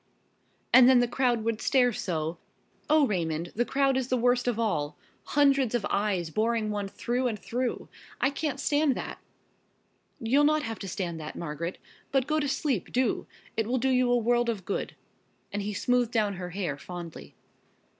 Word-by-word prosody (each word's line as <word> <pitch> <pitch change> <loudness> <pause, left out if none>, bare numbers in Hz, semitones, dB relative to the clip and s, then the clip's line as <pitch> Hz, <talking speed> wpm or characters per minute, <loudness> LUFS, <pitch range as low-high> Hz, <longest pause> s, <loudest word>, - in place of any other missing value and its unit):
And 255 0 +9
then 260 -2 +7
the 245 - +3
crowd 240 -2 +1
would 225 0 -1
stare 250 -3 +3
so! 165 -4 -3 0.5
Oh, 305 -1 +5
Raymond, 170 -5 -2
the 240 - +2
crowd 275 0 +2
is 260 -2 -1
the 255 - +1
worst 245 +1 +2
of 240 -3 +1
all! 155 -10 -1 0.3
Hundreds 275 -4 +3
of 225 -4 0
eyes 195 -5 0
boring 220 +2 0
one 205 -1 -2
through 245 +5 -1
and 225 -3 -2
through! 245 +4 -3 0.3
I 275 - +2
can't 285 -1 -3
stand 290 -1 +2
that!" - - -6 1.0
"You'll 260 +6 +3
not 305 +1 +3
have 225 -5 -4
to 195 - -6
stand 170 -3 -3
that, 155 0 -7
Margaret. 170 +2 -4 0.3
But 270 -2 +2
go 310 +2 +1
to 290 - 0
sleep, 270 - -1
do! 255 -2 0 0.3
It 225 -1 0
will 255 +2 +1
do 265 +2 +1
you 250 -1 +3
a 245 - +4
world 240 +1 +2
of 205 -6 -3
good," 200 - -3 0.6
and 205 - -1
he 205 +1 -3
smoothed 245 +2 +1
down 210 -5 +1
her 180 -1 -5
hair 175 -6 -3
fondly. 170 - -9
235 Hz, 185 wpm, -28 LUFS, 195-255 Hz, 1.0 s, And